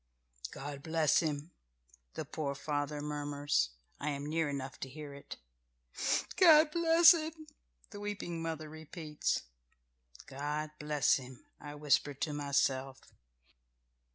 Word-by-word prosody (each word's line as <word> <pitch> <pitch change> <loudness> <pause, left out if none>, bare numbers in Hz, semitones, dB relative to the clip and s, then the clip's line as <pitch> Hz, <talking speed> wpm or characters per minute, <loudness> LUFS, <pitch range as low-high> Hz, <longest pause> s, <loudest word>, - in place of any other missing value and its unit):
"God 140 0 -7
bless 160 -1 +3
him," 155 0 -2 0.6
the - - -4
poor 140 -3 -3
father 145 0 -2
murmurs. 145 - 0 0.3
I 150 - -2
am 140 0 -3
near 160 0 0
enough 135 -1 -5
to 135 - -5
hear 145 +1 -8
it 140 - -9 1.0
"God 315 -4 +7
bless 335 +1 +7
him," 320 -1 -4 0.5
the 205 - -8
weeping 205 -5 -4
mother 160 -1 -4
repeats. 155 0 -3 0.8
"God 150 +3 -3
bless 150 -3 +3
him," 130 -2 -11
I 145 0 -8
whisper 145 -1 +2
to 150 +2 -2
myself. 135 -2 -1
150 Hz, 120 wpm, -33 LUFS, 140-165 Hz, 1.0 s, God